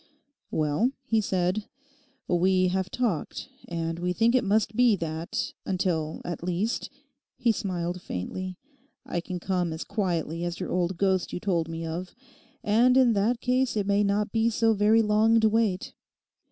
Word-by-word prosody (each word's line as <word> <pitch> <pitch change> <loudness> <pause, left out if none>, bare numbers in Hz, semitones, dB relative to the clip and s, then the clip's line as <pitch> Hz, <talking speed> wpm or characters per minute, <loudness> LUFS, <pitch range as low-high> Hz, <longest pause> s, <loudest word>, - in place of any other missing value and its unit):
'Well,' 155 - +1
he 225 -2 +2
said, 190 +1 0 0.6
'we 185 +1 +3
have 190 0 -1
talked, 220 -11 -2 0.2
and 165 -1 -3
we 180 +1 -1
think 230 +5 +3
it 255 - +3
must 215 +1 +1
be 245 -2 +5
that, 165 -1 -3
until, 170 -4 -1
at 175 -2 -4
least,' 180 +6 -1 0.5
he 240 -2 +3
smiled 180 -3 -3
faintly, 185 - -5 0.5
'I 175 - -2
can 180 0 -5
come 180 -2 -1
as 160 +1 -4
quietly 170 -5 -2
as 175 0 -3
your - - -4
old 180 0 0
ghost 190 -1 +1
you - - -2
told 170 -4 0
me 165 0 -4
of; 175 +3 -5 0.5
and 240 +5 +4
in 250 -3 +5
that 225 +4 +1
case 255 -1 +1
it 205 - 0
may 200 +1 +2
not 205 +1 0
be 225 0 +2
so 225 0 +2
very 215 +2 +4
long 220 +2 +4
to 220 -1 +4
wait. 215 -4 0
190 Hz, 165 wpm, -27 LUFS, 175-220 Hz, 0.6 s, be